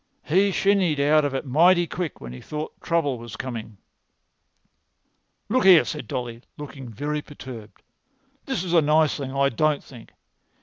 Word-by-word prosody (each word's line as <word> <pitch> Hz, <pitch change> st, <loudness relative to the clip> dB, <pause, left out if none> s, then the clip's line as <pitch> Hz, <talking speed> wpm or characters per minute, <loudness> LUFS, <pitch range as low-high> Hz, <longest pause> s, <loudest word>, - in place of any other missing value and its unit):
"He 190 Hz, +6 st, +3 dB
shinned 190 Hz, -5 st, +2 dB
out 150 Hz, +1 st, +4 dB
of 140 Hz, -1 st, -2 dB
it 135 Hz, -, -3 dB
mighty 170 Hz, +6 st, +4 dB
quick 170 Hz, -1 st, -5 dB
when 60 Hz, -1 st, -8 dB
he 65 Hz, -, -10 dB
thought 150 Hz, +1 st, -6 dB
trouble 145 Hz, -7 st, 0 dB
was 115 Hz, -2 st, -9 dB
coming." 115 Hz, -4 st, -6 dB, 1.7 s
"Look 255 Hz, +4 st, +1 dB
here," 185 Hz, -4 st, +7 dB
said 150 Hz, -, -5 dB
Dolly, 120 Hz, -2 st, -5 dB, 0.2 s
looking 135 Hz, -3 st, -9 dB
very 150 Hz, +7 st, -3 dB
perturbed, 125 Hz, -7 st, -11 dB, 0.6 s
"this 265 Hz, -10 st, -2 dB
is 175 Hz, -2 st, -3 dB
a 170 Hz, -, +6 dB
nice 150 Hz, 0 st, +3 dB
thing, 135 Hz, -2 st, -5 dB
I 140 Hz, 0 st, +2 dB
don't 150 Hz, +3 st, 0 dB
think. 120 Hz, -4 st, -14 dB
150 Hz, 160 wpm, -24 LUFS, 130-165 Hz, 1.7 s, here